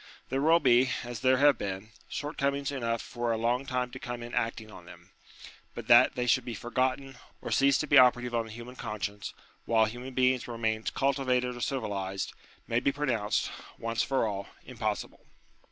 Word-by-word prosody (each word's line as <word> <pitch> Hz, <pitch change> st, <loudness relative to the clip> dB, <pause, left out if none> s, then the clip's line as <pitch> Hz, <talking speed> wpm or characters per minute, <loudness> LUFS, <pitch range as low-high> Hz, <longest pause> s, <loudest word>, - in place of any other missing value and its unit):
There 135 Hz, +1 st, 0 dB
will 165 Hz, +3 st, +5 dB
be, 130 Hz, -3 st, +4 dB
as 120 Hz, -2 st, -6 dB
there 130 Hz, 0 st, +3 dB
have 140 Hz, -2 st, +5 dB
been, 100 Hz, +2 st, -5 dB, 0.2 s
shortcomings 140 Hz, -1 st, -2 dB
enough 115 Hz, -4 st, -2 dB
for 120 Hz, -1 st, -3 dB
a 115 Hz, -, 0 dB
long 120 Hz, +4 st, 0 dB
time 125 Hz, -1 st, -1 dB
to 130 Hz, -, -8 dB
come 120 Hz, -1 st, -6 dB
in 120 Hz, -, -9 dB
acting 115 Hz, -1 st, -2 dB
on 90 Hz, -, -12 dB
them; 90 Hz, +2 st, -14 dB, 0.6 s
but -, -, -6 dB
that -, -, +7 dB
they 125 Hz, -, -1 dB
should 120 Hz, -, +3 dB
be 120 Hz, -, -5 dB
forgotten, 130 Hz, +3 st, -2 dB, 0.2 s
or -, -, -6 dB
cease 140 Hz, 0 st, +4 dB
to -, -, -1 dB
be 145 Hz, -2 st, +6 dB
operative 125 Hz, -1 st, +4 dB
on 115 Hz, -1 st, 0 dB
the -, -, -10 dB
human 120 Hz, +3 st, -9 dB
conscience, 105 Hz, -3 st, -5 dB, 0.3 s
while 110 Hz, -1 st, +4 dB
human 125 Hz, +4 st, -7 dB
beings 130 Hz, -1 st, +2 dB
remain 110 Hz, -2 st, -2 dB
cultivated 130 Hz, -2 st, +1 dB
or 120 Hz, -, -8 dB
civilized, 100 Hz, -7 st, -3 dB, 0.3 s
may 115 Hz, -, +1 dB
be 140 Hz, -, +1 dB
pro 145 Hz, +1 st, -3 dB
nounced, 110 Hz, -5 st, 0 dB, 0.3 s
once 115 Hz, 0 st, -1 dB
for 135 Hz, -4 st, +1 dB
all, 100 Hz, -2 st, -3 dB, 0.2 s
impossible. 110 Hz, -4 st, -4 dB
120 Hz, 185 wpm, -29 LUFS, 110-130 Hz, 0.6 s, that